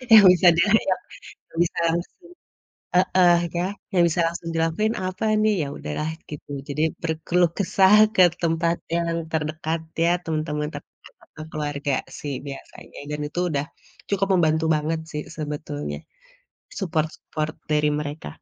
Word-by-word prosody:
Yang 210 - +9
bisa 180 0 +3
diajak— 190 0 +2 0.5
yang 165 - -9
bisa - - -5
langsung 170 - -3 0.8
heeh, 180 -1 +5 0.2
ya 175 +1 +1 0.3
yang 180 -2 +4
bisa 170 +2 0 0.3
dilakuin 165 +8 +1
apa 185 +4 -4 0.2
nih? 215 0 +4
Ya - - -5
udahlah 115 - -3 0.2
gitu, 150 - -9 0.2
jadi 150 +2 -1 0.2
berkeluh 165 +2 +1
kesah 195 0 +4 0.2
ke 185 - +6 0.2
tempat 170 +1 +1 0.2
yang 170 0 0 0.2
terdekat 155 +1 -2 0.2
ya, 170 - +4
temen-temen 155 -2 -2
terdekat - - -10 0.6
keluarga 145 -2 -2 0.2
sih 145 -2 -4
biasanya 140 -1 -10
dan 150 - -3
itu 175 +4 -3
udah 140 0 0 0.5
cukup 195 -1 +1
membantu 160 -2 +2
banget 155 +2 -1
sih 150 -1 -4
sebetulnya 150 -1 -4 0.8
support-support 155 -3 -2 0.2
dari 150 0 +3
mereka. 150 - -5
160 Hz, 130 wpm, -24 LUFS, 150-175 Hz, 0.8 s, Yang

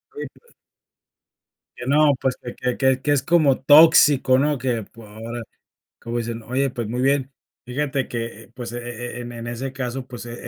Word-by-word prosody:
Oye 440 - -5
pue 475 - -25 1.3
Que 125 - -7
no 145 +1 +4
pues, 130 -1 0
que 120 - -7
que 125 -1 -2
que 130 -1 +2
que 145 - +1
es 140 -2 +3
como 150 -3 +3
tóxico, 145 -3 +6
¿no? 145 +1 +1
Que 120 -2 -1
pue 115 +2 -14
ahora 115 +3 -7 0.6
como 120 +1 -4
dicen, 115 0 -5
oye, 135 +4 0
pues, 120 -4 -5
muy 125 +3 -3
bien. 135 0 +1 0.3
Fíjate 135 +2 -2
que, 115 -2 -5
eh, 115 - -21
pues, 120 -2 -7
e - - -4
e 120 0 -6
e 125 - -5
en 120 - -7
en 120 0 -7
ese 130 +3 -5
caso, 130 -1 -4
pues, 120 -2 -9
e 120 - -7
125 Hz, 200 wpm, -22 LUFS, 120-140 Hz, 1.3 s, tóxico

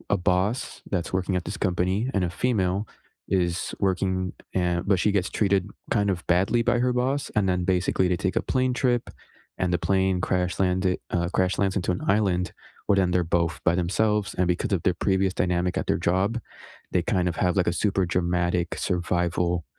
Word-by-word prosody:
a - - 0
boss 95 +6 0
that's 90 -2 -2
working 95 0 0
at 90 -2 -2
this 95 +5 -5
company 95 +5 0
and 95 - +2
a 90 - 0
female 100 -1 0 0.4
is 90 -2 0
working 95 -1 0 0.2
and 90 -2 +1
but 100 -1 +4
she 105 - +2
gets 100 -2 0
treated 100 -2 +1 0.2
kind 100 -2 +2
of 90 -2 -2
badly 95 +7 +2
by 120 +1 +2
her 125 +1 +2
boss, 135 +3 0
and 105 -2 +2
then, 90 -1 0
basically, 90 0 +1
they 90 -1 +1
take 95 +2 -2
a - - +3
plane 130 -1 0
trip, 125 -2 +1 0.6
and 90 -1 0
the - - +3
plane 95 -1 +2
crash-landed 90 0 0
uh, 85 0 0
crash 95 -1 0
lands 95 -1 +1
into 90 -2 0
an 90 - -3
island, 95 -3 +1 0.3
well, 100 - +4
then 95 -2 +2
they're 90 0 +2 0.2
both 80 -2 -2
by 85 - +3
themselves, 105 +3 0
and 90 - +1
because 90 +4 -1
of 90 - +1
their 90 - +2
previous 95 0 +1
dynamic 90 0 0
at - - -1
their - - +2
job, 100 +7 +1 0.5
they 90 - +1
kind 90 -4 +1
of 85 - -4
have, 90 +1 +1
like, 90 - +2
a 85 - +2
super 95 0 +1
dramatic 85 0 0
survival, 90 -1 0
95 Hz, 195 wpm, -25 LUFS, 90-100 Hz, 0.6 s, but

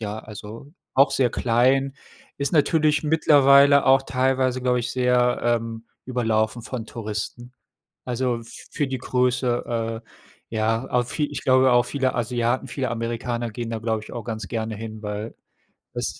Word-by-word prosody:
ja, 105 0 -4
also 110 +6 -10 0.2
auch 135 +2 +5
sehr 125 -3 +2
klein. 130 +4 +2 0.4
Ist 140 +2 -1
natürlich 155 -1 +3
mittlerweile 140 -2 +5
auch 135 0 +5
teilweise, 130 -1 0
glaube 125 -1 +2
ich, 120 - -3
sehr, 125 -1 +2
ähm, 115 -1 -1 0.2
überlaufen 115 -2 0
von 120 -2 -5
Touristen. 115 +3 -5 0.5
Also 125 -1 -1 0.3
für 145 - -1
die 130 - -3
Größe, 120 -2 -1
äh, - - -30 0.5
ja, 115 +3 0
auch 125 0 +1
vie 145 +4 -2
ich 135 - -5
glaube, 130 0 +4
auch 120 0 +5
viele 130 -1 -1
Asiaten, 120 +2 -1
viele 130 0 -3
Amerikaner 115 0 -3
gehen 115 +1 -5
da, 115 -1 -3
glaube 110 -1 -2
ich, - - -12
auch 120 -2 -5
ganz 110 -3 -5
gerne 110 -2 -3
hin, 110 0 -8
weil 105 +1 -5 0.6
es - - -3
120 Hz, 155 wpm, -23 LUFS, 115-130 Hz, 0.6 s, auch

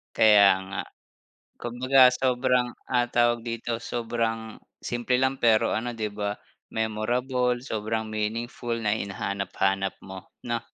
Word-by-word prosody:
Kaya 105 -2 +7 0.2
nga. - - -2 0.8
Kumbaga 130 +2 +5
sobrang 125 -1 +1 0.2
ang 120 -1 +2
tawag 120 -1 +2
dito 115 0 -3
sobrang. 115 -1 -3 0.2
Simple 120 +1 -1
lang 130 +1 +1
pero 110 -2 +4
ano, 120 +2 -3
di 110 -2 -3
ba, 105 0 -3 0.4
memorable 120 +3 0
sobrang 110 -3 -3
meaningful 115 +3 -3
na 105 -1 +1
hinahanap-hanap 95 -1 -2
mo, 95 -1 -11 0.2
no? 120 0 0
115 Hz, 115 wpm, -26 LUFS, 110-125 Hz, 0.8 s, Kaya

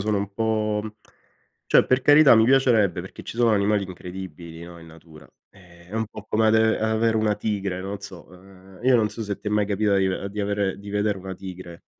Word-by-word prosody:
sono 105 +1 0
un 100 0 -3
po' 110 -1 -1 0.9
cioè - - +5
per 130 +1 +2
carità 145 -1 +7
mi 110 0 +5
piacerebbe 115 -8 +3
perché 95 - -11
ci - - -9
sono 120 -1 +3
animali 100 -1 +1
incredibili, 90 -2 -9
no, 85 0 -11
in 85 - -14
natura. 80 -1 -16 0.2
Eh, 85 -2 -19
è 100 - -10
un 110 0 -1
po' 110 0 -12
come 110 +1 +2
ave 110 0 +3
avere 110 +1 +1
una 110 -1 +1
tigre, 100 -3 -3
non 100 +2 -5
so. 95 -3 -11
Ehm, 95 0 -17
io 130 0 +4
non 110 -2 +2
so 115 - -6
se 100 -2 -4
ti 105 - -5
è - - -5
mai 105 -1 +1
capita 100 0 +1
di 95 -1 +2
ave 95 +1 -3
di 105 +1 -5
avere 100 -1 -1
di 100 0 -10
vedere 105 0 -1
una 95 0 -7
tigre, 90 -2 -10
100 Hz, 220 wpm, -23 LUFS, 95-110 Hz, 0.9 s, carità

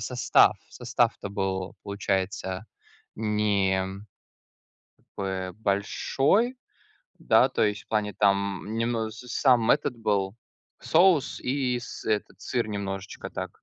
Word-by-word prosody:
состав 125 -1 +4
состав-то 100 - -1
был, 95 -2 -3
получается, 100 -1 -2 0.5
не 100 -3 0 1.2
б 95 -1 -3
большой, 135 - +1 0.6
да, - - +5
то - - -1
есть 105 0 -1
в - - -49
плане, 105 -1 0
там 100 -3 +1
немн 115 -1 -1
с 115 +3 -11
сам 120 -2 +3
этот 145 -4 +2
был 100 -3 0 0.5
соус 170 -3 +3
и 125 -2 0
с 120 - -9
этот 105 -3 -2
сыр 120 +1 -1
немножечко 100 -1 -5
так, - - -7
105 Hz, 110 wpm, -27 LUFS, 95-120 Hz, 1.2 s, да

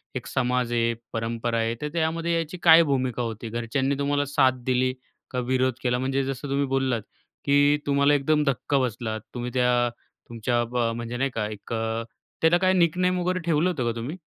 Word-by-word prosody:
एक 125 - -4
समाज 125 -2 0
आहे, 115 -1 +2
एक 115 - -8
परंपरा 115 +1 -2
आहे. 115 0 0
तर 150 - -2
त्यामध्ये 165 +1 0
याची 165 +2 -3
काय 165 0 +8
भूमिका 130 -5 -1
होती? 115 -1 -4
घरच्यांनी 120 +4 -1
तुम्हाला 145 0 +1
साथ 130 -3 +2
दिली 130 0 +1 0.4
का 125 - -2
विरोध 130 +1 +1
केला? 125 -1 +1
म्हणजे 135 +1 0
जसं 135 +1 -4
तुम्ही 140 +1 +1
बोललात, 130 -3 0 0.4
की 145 +1 +4
तुम्हाला 140 0 +3
एकदम 150 +2 +2
धक्का 140 +2 +1
बसला, 115 -3 -2 0.2
तुम्ही 125 0 -4
त्या 125 -1 +2 0.4
तुमच्या 120 +1 0
ब 125 - -2 0.2
म्हणजे 120 +1 -5
नाही 135 +1 0
का? 105 -2 -1
एक 105 +2 -8
अ, 115 0 -2 0.4
त्याला 160 +2 +5
काय 185 +1 +2
निकनेम 180 +1 +2
वगैरे 180 +1 0
ठेवलं 165 +1 +2
होतं 145 -9 -2
का 120 - +1
तुम्ही? 145 +10 -5
130 Hz, 190 wpm, -25 LUFS, 120-145 Hz, 0.4 s, काय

